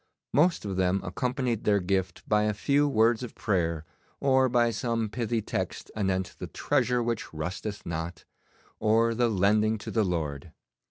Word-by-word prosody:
Most 165 -3 +3
of 95 -2 -3
them 95 +1 +2
accompanied 125 +5 -2
their 100 -1 +3
gift 95 -1 -2
by 105 0 +3
a 105 -1 0
few 145 +7 +2
words 115 -3 +3
of 125 - -7
prayer, 85 -6 -1 0.3
or 130 -1 +3
by 120 -1 +3
some 115 0 -1
pithy 115 -1 -1
text - - -4
anent 95 -3 -1
the - - -5
treasure 125 -1 +1
which 115 -2 -3
rusteth 90 +6 -5
not, 80 0 -5 0.5
or 115 +2 +3
the 120 +1 +2
lending 105 +2 +2
to 105 - -7
the 110 - +2
Lord. 80 -4 -3
105 Hz, 160 wpm, -28 LUFS, 95-120 Hz, 0.5 s, Most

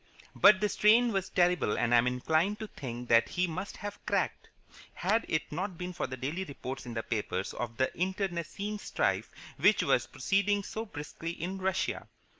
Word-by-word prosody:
But 200 0 +6
the 210 - +3
strain 230 +3 +4
was 195 -1 -1
terrible 175 - +2
and 120 - +1
I 120 - +8
am 120 - +2
inclined 160 +11 +1
to 220 - -6
think 125 -3 -7
that 115 0 +5
he 180 0 +1
must 180 +4 -5
have 205 +1 -7
cracked, - - -1 0.5
had 215 +6 +1
it 155 - -1
not 180 +3 -3
been 180 +1 -5
for 175 - -2
the 130 0 -6
daily 150 +9 -3
reports 135 -5 -7
in 120 - -6
the 115 - -2
papers 100 -4 -2
of 115 -1 -5
the 130 - 0
internecine 190 +2 -2
strife - - 0 0.3
which - - +4
was - - +2
proceeding 200 +1 +1
so 220 +3 -5
briskly 155 -1 -6
in 185 +3 -3
Russia. 190 0 -1
180 Hz, 185 wpm, -30 LUFS, 130-200 Hz, 0.5 s, I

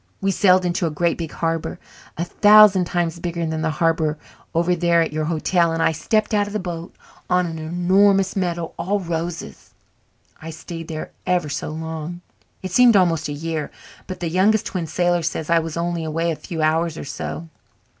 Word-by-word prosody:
We 195 0 +1
sailed 185 -1 +4
into 175 -1 0
a - - -1
great 170 +2 0
big 165 -2 -4
harbour, 165 -1 -2 0.4
a 170 - -1
thousand 205 -1 +6
times 170 -1 -2
bigger 170 -1 -3
than 160 0 -2
the 160 - 0
harbour 160 -1 0 0.4
over 170 +2 +2
there 170 0 +2
at 165 -2 0
your 155 0 -1
hotel, 170 +1 +1
and 165 0 0
I - - +3
stepped 215 +8 0
out 205 -1 +2
of 205 - -8
the 215 - -1
boat 175 -2 -6 0.3
on 180 0 +3
a 165 - -4
'normous 185 +4 +2
meadow 175 -3 -2
all 195 +5 0
roses. 170 -1 -5 0.7
I 160 - -7
stayed 165 +1 -8
there 155 -1 -5
for - - -24 0.2
ever 175 -4 +1
so 145 +2 -4
long. 160 +2 -6 0.4
It 185 - -4
seemed 240 +3 +6
almost 175 -4 +3
a - - -5
year, 155 +1 -3 0.4
but 185 - -7
the 170 - -1
Youngest 200 +4 +3
Twin 175 -4 -3
Sailor 175 +2 +1
says 160 0 -3
I 170 - +5
was 165 0 -5
only 170 -1 -2
away 165 +2 -1
a - - -2
few 160 0 -5
hours 160 +1 +1
or - - -6
so. 155 +4 -6
170 Hz, 195 wpm, -21 LUFS, 160-180 Hz, 0.7 s, thousand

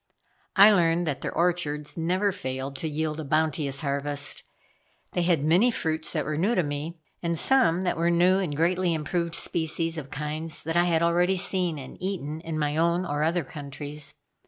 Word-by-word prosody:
I 205 +2 +9
learned 175 -3 +2
that 145 -4 -3
their - - -3
orchards 165 -4 -1
never 185 +5 +1
failed 130 -5 -5
to 160 - -3
yield 155 +1 -2
a - - -3
bounteous 150 -2 0
harvest. 140 0 +1 0.7
They 175 - -1
had 170 -4 +2
many 180 +10 +4
fruits 160 -8 -2
that 155 -3 -2
were 150 0 -2
new 205 +9 +1
to 180 - +2
me, 150 +3 -5 0.2
and 170 -1 -1
some 180 -7 +3
that 180 - -1
were 170 +1 +2
new 180 +2 +4
and 170 -7 -2
greatly 175 +2 +1
improved 170 +2 -2
species 165 0 0
of 140 -3 -9
kinds 150 +2 -4
that 165 +1 -3
I 175 0 +4
had 165 -1 +2
already 175 +3 +2
seen 180 -3 0
and 135 +4 -10
eaten 160 -5 -4
in 160 -1 -4
my 150 0 -1
own 170 +2 +2
or 145 -3 -2
other 165 +2 +1
countries. 145 +1 -5
165 Hz, 185 wpm, -26 LUFS, 150-175 Hz, 0.7 s, I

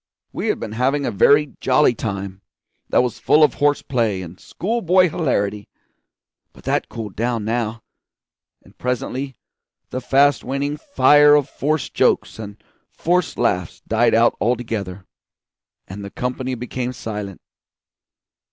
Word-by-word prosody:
We - - -3
had - - 0
been 105 - -6
having 135 +5 0
a - - -1
very 145 +7 +4
jolly 130 0 +4
time, 100 -3 -5 0.5
that - - +3
was 125 - -3
full 155 - +4
of 150 - +4
horse 145 0 +1
play 110 -7 -1
and 85 +1 -11
school 230 +6 -3
boy 185 0 +4
hilarity; 105 - -1 0.9
but - - -17
that - - -1
cooled 105 -5 -7
down 115 -1 -1
now, 115 0 -2 0.8
and - - -21
presently 125 +2 -3 0.6
the 130 - -3
fast 140 +1 +3
waning 140 +3 -2
fire 145 - +5
of 145 -2 +2
forced 155 +1 -2
jokes - - +1
and 105 -2 -8 0.3
forced 180 +1 -1
laughs 90 -2 -1
died 115 +1 +3
out 115 +1 +4
altogether, 110 -6 -2 0.8
and 100 +2 -8
the 100 - -6
company 125 +3 -3
became 125 +1 -4
silent. 105 -5 -6
125 Hz, 140 wpm, -20 LUFS, 105-145 Hz, 0.9 s, fire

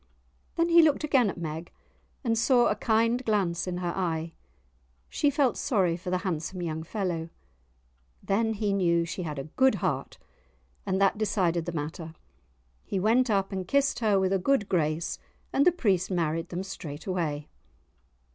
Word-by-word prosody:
Then 335 +1 +2
he 335 0 +8
looked 310 -2 +3
again 265 -7 +3
at - - -6
Meg 160 0 -5 0.5
and 230 -3 +1
saw 240 +2 +4
a 210 - +1
kind 230 +3 +1
glance 190 -6 0
in 180 -1 -2
her 175 -1 -2
eye; 165 -3 -2 0.8
she 290 - +1
felt 280 -3 +1
sorry 190 - +1
for 180 +1 -6
the 185 - +1
handsome 175 +1 -3
young 160 -1 -3
fellow. 170 -2 -3 0.9
Then 225 +3 +1
he 205 -1 -1
knew 170 -3 +2
she 175 - -5
had 155 -4 -4
a 135 - -3 0.2
good 265 0 +6
heart, - - -2 0.7
and 190 0 0
that 200 +1 +2
decided 180 -6 0
the - - -1
matter; 160 +1 -5 0.7
he 195 - -2
went 230 +6 +3
up 195 -2 +1
and 190 -2 -4
kissed 280 +2 +2
her 210 -4 +3
with 190 0 +1
a 195 - +2
good 220 0 +1
grace, 160 -1 -1 0.3
and 280 +5 +3
the - - +7
priest 200 - +1
married 165 -2 -1
them 180 +2 -4
straight 160 -6 -8
away. 155 -6 -2
190 Hz, 170 wpm, -28 LUFS, 170-225 Hz, 0.9 s, he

